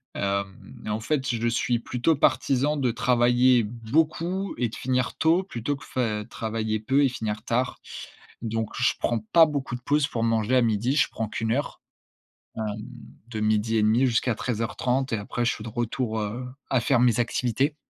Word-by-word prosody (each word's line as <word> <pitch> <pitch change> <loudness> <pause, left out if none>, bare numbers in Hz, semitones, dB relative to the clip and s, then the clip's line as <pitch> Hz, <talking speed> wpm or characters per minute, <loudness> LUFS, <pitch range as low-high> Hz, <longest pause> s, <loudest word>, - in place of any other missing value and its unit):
Hem, 100 -1 -4
et - - -4
en 105 +1 -1
fait, 135 +3 -1
je 115 0 0
suis 120 +1 +1
plutôt 125 +7 0
partisan 140 +1 +2
de 130 -4 +1
travailler 125 +1 +3
beaucoup 160 - -1
et 120 - +1
de 110 - -9
finir 125 -1 -1
tôt, 165 +4 +3
plutôt 145 - -3
que - - -13
fai 110 -4 -2
travailler 110 -1 -2
peu 135 +6 +2
et - - +3
finir 110 -3 -4
tard. 125 +2 -1 0.6
Donc, 110 -1 -2
je 125 - +4
prends 120 - 0
pas 165 -1 +8
beaucoup 140 -4 -3
de 125 - -8
pause 145 +2 +2
pour 115 -5 -3
manger 115 +1 +1
à - - +5
midi. 115 +4 +1
Je - - +4
prends 110 - -3
qu'1 110 +1 -1
heure. 140 +4 -3 0.8
Hem, 110 - -2 0.7
de 110 -3 -4
12:30 110 +2 +2
jusqu'à 120 0 +1
13:30 125 +3 -1
et - - +2
après 115 +4 -3
je 115 - +2
suis 105 - -8
de 115 - -6
retour, 120 0 -2
heu, 110 +5 -4 0.2
à 130 - +2
faire 125 +1 +2
mes 120 -2 +3
activités 125 +4 0
120 Hz, 180 wpm, -25 LUFS, 110-130 Hz, 0.8 s, pas